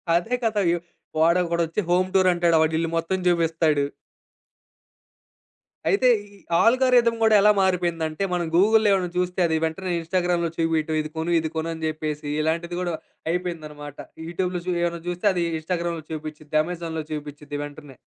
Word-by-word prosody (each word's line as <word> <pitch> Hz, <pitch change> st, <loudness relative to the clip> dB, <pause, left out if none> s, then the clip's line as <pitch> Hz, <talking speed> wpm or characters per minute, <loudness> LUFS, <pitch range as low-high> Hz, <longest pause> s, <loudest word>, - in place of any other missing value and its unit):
అదే 225 Hz, +9 st, +1 dB
కదా! 215 Hz, -2 st, +1 dB
వ్యు 175 Hz, -, +1 dB, 0.4 s
వాడొకడొచ్చి 170 Hz, +2 st, +2 dB
హోమ్ 180 Hz, +1 st, +3 dB
టూరంటాడు. 175 Hz, -3 st, +4 dB
వాడిల్లు 160 Hz, +1 st, +1 dB
మొత్తం 175 Hz, +3 st, -1 dB
జూపిస్తాడు. 165 Hz, -4 st, +2 dB, 2.0 s
అయితే 260 Hz, -11 st, +3 dB, 0.3 s
ఈ -, -, -17 dB, 0.2 s
ఆల్‌గారిథమ్ 240 Hz, -1 st, +4 dB
గూడా 220 Hz, -1 st, +5 dB
ఎలా 210 Hz, +1 st, +6 dB
మారిపోయిందంటే, 175 Hz, -2 st, 0 dB
మనం 175 Hz, -1 st, 0 dB
గూగుల్‌లో 215 Hz, +3 st, +5 dB
ఏమైనా 180 Hz, -2 st, 0 dB
చూస్తే 180 Hz, 0 st, -1 dB
అది 160 Hz, 0 st, +1 dB
వెంటనే 180 Hz, +3 st, -3 dB
ఇన్‌స్టా‌గ్రామ్‌లో 175 Hz, 0 st, 0 dB
చూపిటం. 160 Hz, -1 st, 0 dB
ఇది 155 Hz, -, -6 dB
కొను, 165 Hz, +2 st, -1 dB
ఇది 160 Hz, -1 st, -3 dB
కొను 160 Hz, +1 st, -2 dB
అని 160 Hz, 0 st, -5 dB
చెప్పేసి 155 Hz, -1 st, -4 dB
ఇలాంటిది 170 Hz, +2 st, -1 dB
గూడా 175 Hz, -2 st, -2 dB, 0.4 s
అయిపోయిందనమాట. 155 Hz, -5 st, -5 dB, 0.3 s
యూట్యూబ్‌లో 180 Hz, +1 st, -2 dB
జూ -, -, +1 dB
ఎమైనా 170 Hz, -1 st, -2 dB
జూస్తే 175 Hz, +3 st, -1 dB
అది 175 Hz, -1 st, 0 dB, 0.2 s
ఇన్‌స్టా‌గ్రామ్‌లో 170 Hz, -1 st, -3 dB
చూపిచ్చిద్ది. 155 Hz, -1 st, -7 dB
అమెజాన్‌లో 165 Hz, -2 st, -4 dB
చూపిచ్చిద్ది 145 Hz, -1 st, -6 dB
వెంటనే. 145 Hz, -2 st, -10 dB
170 Hz, 140 wpm, -24 LUFS, 160-180 Hz, 2.0 s, ఎలా